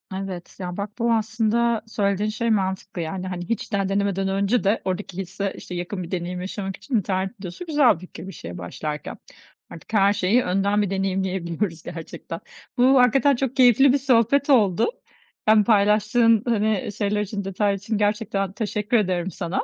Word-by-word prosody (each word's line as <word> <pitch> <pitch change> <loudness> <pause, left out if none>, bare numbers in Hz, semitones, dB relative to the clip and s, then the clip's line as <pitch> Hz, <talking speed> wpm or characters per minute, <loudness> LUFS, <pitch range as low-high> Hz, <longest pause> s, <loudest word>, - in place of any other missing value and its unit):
Evet. 190 -2 -6
Ya, 180 -1 -5
bak, 200 +1 -3
bu 235 0 +2
aslında 225 +1 +1
söylediğin 205 -1 0
şey 230 +2 -2
mantıklı 190 -3 -1
yani. 180 +3 -4
Hani, 180 0 -5
hiç 230 - -2
daha 195 -1 0
denemeden 195 -1 0
önce 200 +5 +1
de 205 +3 +1
oradaki 185 -1 -3
hisse, 190 +1 -3
işte, 180 - -8
yakın 180 +2 -4
bir 170 - -9
deneyim 180 0 -3
yaşamak 195 0 -5
için 265 - -4
internet 190 +2 -1
videosu 185 - -7
güzel 295 -6 +4
bir - - -12
fikir 180 -1 -10
bir - - -6
şeye 85 - -8
başlarken. 150 - -5 0.5
Artık 170 - -12
her 200 -1 +4
şeyi 205 +5 +2
önden 195 +3 +1
bir 205 - 0
deneyimleyebiliyoruz 190 -3 -2
gerçekten. 165 -1 -7 0.4
Bu 255 +2 +5
hakikaten 265 +3 +4
çok 265 0 -2
keyifli 255 +1 +6
bir 285 - +4
sohbet 270 +2 +2
oldu. 215 -5 +4 0.6
Ben 215 -1 +6
paylaştığın, 215 +2 +3
hani, 215 -3 +1
şeyler 210 0 0
için 205 0 -4
detaylar 200 +1 0
için 205 +2 -3
gerçekten 205 -2 0
teşekkür 210 +2 0
ederim 185 -3 0
sana. 175 0 -3
200 Hz, 170 wpm, -23 LUFS, 185-225 Hz, 0.6 s, keyifli